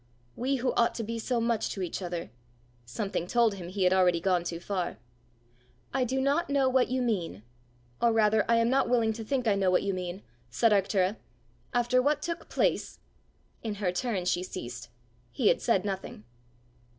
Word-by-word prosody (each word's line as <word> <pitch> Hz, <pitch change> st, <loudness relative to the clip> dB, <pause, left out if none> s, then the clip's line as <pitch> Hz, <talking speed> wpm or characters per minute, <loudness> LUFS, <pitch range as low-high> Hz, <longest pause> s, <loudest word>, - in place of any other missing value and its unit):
"We 265 Hz, +3 st, 0 dB
who 255 Hz, 0 st, 0 dB
ought 235 Hz, -, +2 dB
to 230 Hz, -, -3 dB
be 230 Hz, +1 st, -4 dB
so 240 Hz, +1 st, -1 dB
much 230 Hz, -1 st, 0 dB
to 195 Hz, -, -4 dB
each 180 Hz, -, -4 dB
other 175 Hz, -, -4 dB, 0.3 s
" -, -, -34 dB, 0.3 s
Something 195 Hz, -, -3 dB
told 235 Hz, 0 st, +3 dB
him 185 Hz, -3 st, -7 dB
he 190 Hz, +1 st, -1 dB
had 180 Hz, 0 st, +4 dB
already 180 Hz, -2 st, +4 dB
gone 180 Hz, 0 st, +1 dB
too 170 Hz, -1 st, -4 dB
far. 180 Hz, -1 st, -3 dB, 1.0 s
"I 265 Hz, -2 st, +1 dB
do 260 Hz, +2 st, -1 dB
not 285 Hz, +6 st, +1 dB
know 280 Hz, -2 st, +3 dB
what 260 Hz, -1 st, +3 dB
you 255 Hz, 0 st, -1 dB
mean 175 Hz, -, -2 dB, 0.6 s
or 235 Hz, -, +4 dB
rather, 220 Hz, -1 st, +3 dB
I 230 Hz, -, +5 dB
am 230 Hz, 0 st, +3 dB
not 265 Hz, 0 st, +2 dB
willing 230 Hz, -3 st, +2 dB
to 225 Hz, +1 st, -6 dB
think 250 Hz, +1 st, -1 dB
I 210 Hz, -, +4 dB
know 195 Hz, -2 st, +2 dB
what 180 Hz, -, +3 dB
you 200 Hz, -, -1 dB
mean," 180 Hz, +1 st, -5 dB, 0.3 s
said 220 Hz, -, +2 dB
Arctura. 195 Hz, 0 st, +2 dB, 0.5 s
"After 245 Hz, +1 st, +2 dB
what 295 Hz, +2 st, +1 dB
took 335 Hz, -1 st, -4 dB
place -, -, 0 dB, 0.3 s
" -, -, -39 dB
In 220 Hz, -2 st, -3 dB
her 195 Hz, -3 st, -1 dB
turn 190 Hz, -1 st, -2 dB
she 180 Hz, 0 st, +1 dB
ceased: 120 Hz, -8 st, -7 dB, 0.4 s
he 120 Hz, -, +2 dB
had -, -, +2 dB
said 205 Hz, -5 st, +2 dB
nothing! 195 Hz, -, -5 dB
210 Hz, 200 wpm, -29 LUFS, 185-240 Hz, 1.0 s, I